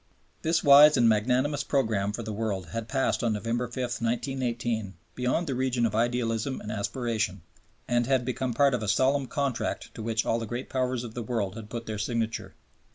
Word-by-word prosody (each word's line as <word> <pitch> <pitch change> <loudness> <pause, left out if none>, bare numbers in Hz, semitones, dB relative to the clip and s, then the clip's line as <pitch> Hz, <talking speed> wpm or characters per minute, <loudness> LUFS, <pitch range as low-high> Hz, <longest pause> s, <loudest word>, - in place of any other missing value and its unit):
This 165 +1 +1
wise 145 +1 +8
and 120 - +5
magnanimous 125 +6 +2
program 110 -9 0
for 115 +3 -5
the 110 0 -5
world 100 -5 -3
had 115 +6 -4
passed 135 -1 0
on 115 -2 +2
November 115 +3 -1
5, 120 - -12 0.3
1918 115 -4 -2 0.2
beyond 125 +7 0
the 140 - -2
region 125 -2 +1
of 110 - -1
idealism 115 +2 0
and 105 - -6
aspiration, 110 - -2 0.4
and 120 -1 +1
had 130 -2 +2
become 130 -1 -2
part 140 +1 +4
of 125 - 0
a 110 - -3
solemn 130 +5 +2
contract 140 -4 -2
to - - -8
which 110 0 -1
all 115 - +1
the 115 - -5
Great 120 +4 -5
Powers 130 -2 -1
of 115 -2 -7
the 120 - -4
world 105 -4 -2
had 110 -2 -8
put 115 0 -5
their 110 -1 -4
signature. 115 +1 -2
120 Hz, 195 wpm, -27 LUFS, 110-130 Hz, 0.4 s, wise